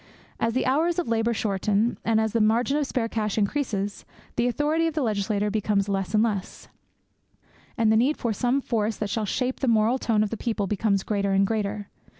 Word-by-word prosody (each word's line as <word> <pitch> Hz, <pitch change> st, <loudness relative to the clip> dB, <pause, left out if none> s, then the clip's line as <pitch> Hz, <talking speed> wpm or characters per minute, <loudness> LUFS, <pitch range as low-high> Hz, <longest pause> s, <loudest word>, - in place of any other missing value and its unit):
As 230 Hz, 0 st, 0 dB
the 260 Hz, -, +1 dB
hours 320 Hz, +6 st, +1 dB
of 355 Hz, -, -1 dB
labour 230 Hz, 0 st, +1 dB
shorten, 210 Hz, +2 st, 0 dB
and 225 Hz, -1 st, +2 dB
the 220 Hz, +1 st, +1 dB
margin 235 Hz, +6 st, +2 dB
of 295 Hz, -2 st, 0 dB
spare 235 Hz, -3 st, -1 dB
cash 215 Hz, -2 st, -2 dB
increases, 205 Hz, -3 st, -1 dB, 0.3 s
the 240 Hz, +1 st, +1 dB
authority 300 Hz, +6 st, +1 dB
of 320 Hz, -, -4 dB
the 300 Hz, -, 0 dB
legislator 210 Hz, -1 st, 0 dB
becomes 205 Hz, -1 st, 0 dB
less 195 Hz, +1 st, -1 dB
and 215 Hz, -, +4 dB
less; 205 Hz, -5 st, -3 dB, 1.1 s
and 225 Hz, -2 st, +3 dB
the -, -, +4 dB
need 255 Hz, +7 st, +2 dB
for 235 Hz, -3 st, -1 dB
some 250 Hz, +6 st, +1 dB
force 220 Hz, -3 st, -1 dB
that 210 Hz, -2 st, -3 dB
shall 220 Hz, -3 st, -1 dB
shape 255 Hz, +5 st, -1 dB
the 270 Hz, -, -1 dB
moral 230 Hz, +2 st, +3 dB
tone 215 Hz, -3 st, +2 dB
of 210 Hz, -, -3 dB
the 230 Hz, -, -3 dB
people 220 Hz, -3 st, -2 dB
becomes 200 Hz, 0 st, 0 dB
greater 200 Hz, -2 st, 0 dB
and 195 Hz, +1 st, +4 dB
greater. 205 Hz, -1 st, -2 dB
220 Hz, 200 wpm, -25 LUFS, 205-245 Hz, 1.1 s, and